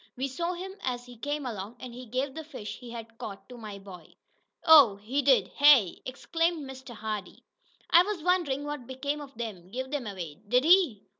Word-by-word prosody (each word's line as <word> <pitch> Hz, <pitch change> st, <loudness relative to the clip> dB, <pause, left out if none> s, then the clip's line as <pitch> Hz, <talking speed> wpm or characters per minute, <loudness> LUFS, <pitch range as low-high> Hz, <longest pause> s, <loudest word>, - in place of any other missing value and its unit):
We 265 Hz, +2 st, -1 dB
saw 335 Hz, +7 st, -2 dB
him 375 Hz, +2 st, -6 dB
as 245 Hz, -1 st, -3 dB
he 245 Hz, 0 st, -12 dB
came 290 Hz, +4 st, -3 dB
along, 215 Hz, -1 st, -5 dB
and 250 Hz, -2 st, -8 dB
he 250 Hz, +1 st, -9 dB
gave 260 Hz, +4 st, -2 dB
the 320 Hz, -, -6 dB
fish 260 Hz, -9 st, -8 dB
he 245 Hz, -, -10 dB
had 230 Hz, -1 st, -9 dB
caught 200 Hz, -2 st, -8 dB
to 250 Hz, -, -9 dB
my 215 Hz, -4 st, -8 dB
boy." 185 Hz, -5 st, -13 dB, 0.5 s
"Oh, 290 Hz, -10 st, +8 dB
he 230 Hz, +8 st, -2 dB
did, 265 Hz, -2 st, +4 dB
hey?" 275 Hz, -11 st, +5 dB
exclaimed 330 Hz, +3 st, -1 dB
Mr. 260 Hz, -2 st, -10 dB
Hardee. 215 Hz, -3 st, -5 dB, 0.5 s
"I 340 Hz, -, +9 dB
was 375 Hz, -3 st, -3 dB
wonderin' 335 Hz, -6 st, +1 dB
what 290 Hz, -4 st, -5 dB
become 285 Hz, +3 st, -3 dB
of 275 Hz, -5 st, -12 dB
'em. 195 Hz, -7 st, -6 dB
Give 260 Hz, +5 st, -5 dB
'em 270 Hz, -6 st, -2 dB
away, 180 Hz, -4 st, -7 dB
did 250 Hz, +4 st, +3 dB
he? 330 Hz, -, +4 dB
255 Hz, 200 wpm, -28 LUFS, 220-290 Hz, 0.5 s, I